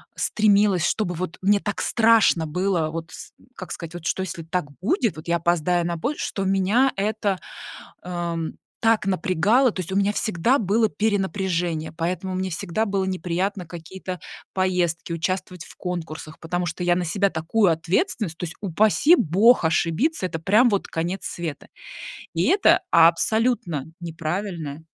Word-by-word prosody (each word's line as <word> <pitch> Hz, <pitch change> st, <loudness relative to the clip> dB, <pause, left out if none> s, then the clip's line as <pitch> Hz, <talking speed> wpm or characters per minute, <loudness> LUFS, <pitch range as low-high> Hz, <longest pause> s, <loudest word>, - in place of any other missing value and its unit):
стремилась, 205 Hz, -4 st, +3 dB
чтобы 190 Hz, -5 st, -1 dB
вот 175 Hz, 0 st, -4 dB
мне 200 Hz, +2 st, +3 dB
так 205 Hz, 0 st, -3 dB
страшно 225 Hz, -8 st, +4 dB
было 175 Hz, 0 st, 0 dB
вот 165 Hz, +1 st, -6 dB
с -, -, -10 dB, 0.2 s
как 185 Hz, -, -8 dB
сказать, 165 Hz, 0 st, -7 dB
что 190 Hz, -, 0 dB
если 170 Hz, -2 st, -5 dB
так 165 Hz, +1 st, -2 dB, 0.2 s
будет, 230 Hz, -, +1 dB
вот 155 Hz, +2 st, -10 dB
я 170 Hz, -, +2 dB
опоздаю 175 Hz, +1 st, +1 dB
на 170 Hz, -1 st, -2 dB
поезд, 265 Hz, -, -3 dB
что 195 Hz, -, -3 dB
меня 195 Hz, +7 st, +2 dB
это, 200 Hz, -1 st, -1 dB, 0.6 s
ам, 170 Hz, -2 st, -3 dB, 0.3 s
так 225 Hz, -3 st, +2 dB
напрягало. 195 Hz, +7 st, +2 dB
То 185 Hz, -, -4 dB
есть 185 Hz, -, -5 dB
у 190 Hz, -, -2 dB
меня 200 Hz, +1 st, +2 dB
всегда 215 Hz, +6 st, +1 dB
было 220 Hz, +1 st, +2 dB
перенапряжение, 190 Hz, -6 st, -1 dB
поэтому 180 Hz, +3 st, -3 dB
мне 185 Hz, 0 st, -2 dB
всегда 195 Hz, +5 st, -2 dB
было 195 Hz, -2 st, -1 dB
неприятно 185 Hz, +1 st, -2 dB
какие-то 180 Hz, +2 st, -8 dB, 0.3 s
поездки, 180 Hz, -3 st, 0 dB
участвовать 180 Hz, +1 st, -3 dB
в -, -, -14 dB
конкурсах, 160 Hz, -3 st, -6 dB
потому 175 Hz, +2 st, -2 dB
что 175 Hz, +2 st, -4 dB
я 175 Hz, -, +3 dB
на 180 Hz, 0 st, -1 dB
себя 200 Hz, +3 st, +1 dB
такую 175 Hz, +4 st, +2 dB
ответственность 175 Hz, -, -1 dB
то 180 Hz, -, -5 dB
есть, 165 Hz, -, -6 dB
упаси 215 Hz, -, +4 dB
бог 205 Hz, -, +4 dB
ошибиться, 170 Hz, -, +1 dB
это 165 Hz, -3 st, -4 dB
прям 210 Hz, +9 st, +4 dB
вот 200 Hz, -4 st, 0 dB
конец 175 Hz, +4 st, -3 dB
света. 165 Hz, -5 st, -5 dB, 0.7 s
И 165 Hz, -, +1 dB
это 385 Hz, +4 st, +4 dB
абсолютно 170 Hz, -, +3 dB
неправильное 165 Hz, -2 st, -4 dB
180 Hz, 155 wpm, -23 LUFS, 165-205 Hz, 0.7 s, страшно